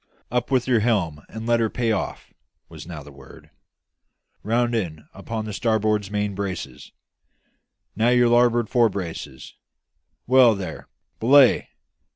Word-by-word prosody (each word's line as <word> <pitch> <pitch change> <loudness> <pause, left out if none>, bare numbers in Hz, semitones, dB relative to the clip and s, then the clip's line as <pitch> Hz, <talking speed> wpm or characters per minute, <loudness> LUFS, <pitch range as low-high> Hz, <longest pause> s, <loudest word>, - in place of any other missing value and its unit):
"Up 125 -1 -1
with 130 -2 +1
your 125 -3 +3
helm 95 -10 -1
and 110 0 -8
let 120 0 +2
her 115 -1 +1
pay 115 0 -1
off!" 105 - -4 0.4
was - - -11
now 80 -4 -8
the 75 - -13
word; 70 -1 -16 0.9
"round 120 +2 0
in 80 -9 -3
upon 110 +3 -5
the 105 - -6
starboard 110 -2 0
main 105 0 -2
braces; 95 -10 -6 1.0
now 115 +2 +2
your 125 0 +4
larboard 120 -1 +3
fore 120 -1 +3
braces; 90 -5 -7 0.7
well 125 -3 +5
there; 90 -5 -7 0.3
belay! 130 +2 +5
110 Hz, 140 wpm, -23 LUFS, 95-120 Hz, 1.0 s, well